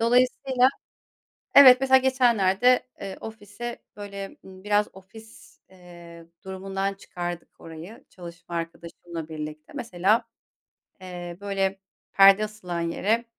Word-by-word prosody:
dolayısıyla 250 +2 +3 0.9
Evet 260 -2 +9
mesela 265 0 +5
geçenlerde, 250 -3 +3
eee, 195 -1 -6
ofise 220 +2 -8
böyle, 200 -1 -8
ımm, 190 0 -14
biraz 210 0 +2
ofis, 220 +4 -16
eee, 175 -2 -14 0.2
durumundan 195 +1 -4
çıkardık 175 -3 -7
orayı 170 - -11
çalışma 170 -1 -10
arkadaşımla 170 0 -7
birlikte. 155 0 -8
Mesela, 210 +3 +1 0.8
eee, 175 -1 -8
böyle 195 -1 -1 0.3
perde 195 +1 +6
asılan 180 -5 -6
yere 205 +8 0
195 Hz, 105 wpm, -25 LUFS, 175-225 Hz, 0.9 s, Evet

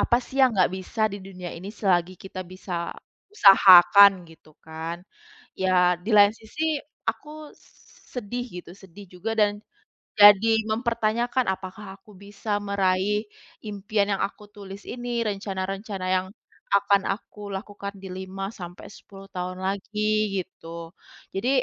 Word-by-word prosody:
apa 240 - +3
sih 265 - -11
yang 260 - +6
nggak 185 - +4
bisa 190 +4 -7
di 200 - -5
dunia 185 -2 -8
ini 185 +4 -8
selagi 185 -4 0
kita 190 -1 -8
bisa 185 +1 -10 0.6
usahakan 195 - +8 0.2
gitu 160 -1 -19
kan. 160 +1 -6 0.6
Ya 180 -1 +3
di 220 - -5
lain 205 0 +7
sisi 305 +8 -3 0.3
aku 305 0 -8 0.6
sedih 245 +1 -4 0.2
gitu, 170 - -14
sedih 195 +1 -14
juga 180 +5 -4
dan 210 -1 +4 0.7
jadi 205 +2 +8 0.2
mempertanyakan 235 +2 0
apakah 190 +1 -10
aku 200 +2 -21
bisa 205 +2 -8
meraih 200 +1 0 0.4
impian 205 0 -1
yang - - -4
aku 210 - -15
tulis 200 0 -10
ini? 245 0 -7 0.2
Rencana-rencana 195 -1 -4
yang 185 0 +1 0.4
akan 200 0 +3
aku 210 +1 -5
lakukan 200 0 -6
di 190 - -10
5 190 +1 -6
sampai 175 -1 -9
10 195 0 -14
tahun 180 0 -5
lagi 200 +2 -3 0.4
gitu. 165 -2 -11 0.4
Jadi 195 +6 -1
195 Hz, 135 wpm, -25 LUFS, 185-210 Hz, 0.7 s, usahakan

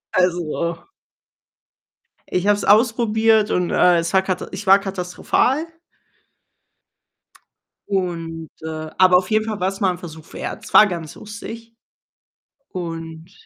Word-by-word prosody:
Also 170 -2 -1 1.4
ich 180 +1 -1
habe 205 0 +4
es - - -4
ausprobiert 220 -1 +3
und, 180 -1 0
äh, 180 -1 +4
es 170 +2 -3
war 190 - +5
kata 185 -1 -3
ich 195 +2 -7
war 195 +1 +7
katastrophal. 195 - -1 2.2
Und 165 -4 -3
äh, 155 0 -6
aber 185 -1 +6
auf 180 +3 -2
jeden 215 0 +2
Fall 215 -4 -4
war's 190 +1 -1
mal 190 -4 +2
'n 180 - -6
Versuch 160 -3 -11
wert. - - -6
Es - - -11
war 215 - +8
ganz 170 -5 -6
lustig. 225 +2 -9 1.0
Und 165 -1 -7
185 Hz, 130 wpm, -21 LUFS, 170-210 Hz, 2.2 s, war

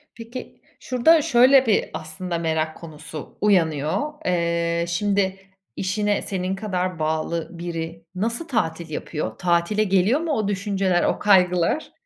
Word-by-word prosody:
Peki, 235 +2 -9 0.2
şurada 295 +6 +4
şöyle 265 -2 +5
bir, 215 - +2
aslında, 170 +2 -4
merak 160 -1 -1
konusu 155 -2 -10
uyanıyor. 160 -7 +2 0.2
Eee, 170 -1 0
şimdi, 195 +1 0 0.4
işine 205 +2 0
senin 190 0 -2
kadar 185 -4 -2
bağlı 160 +1 -1
biri 165 -1 -5
nasıl 230 - -2
tatil 170 - -2
yapıyor? 150 -5 -4
Tatile 175 +5 +1
geliyor 195 - +2
mu 330 -2 -2
o 215 -6 0
düşünceler, 195 -3 0
o - - +1
kaygılar? 180 - +3
185 Hz, 125 wpm, -23 LUFS, 170-210 Hz, 0.4 s, şöyle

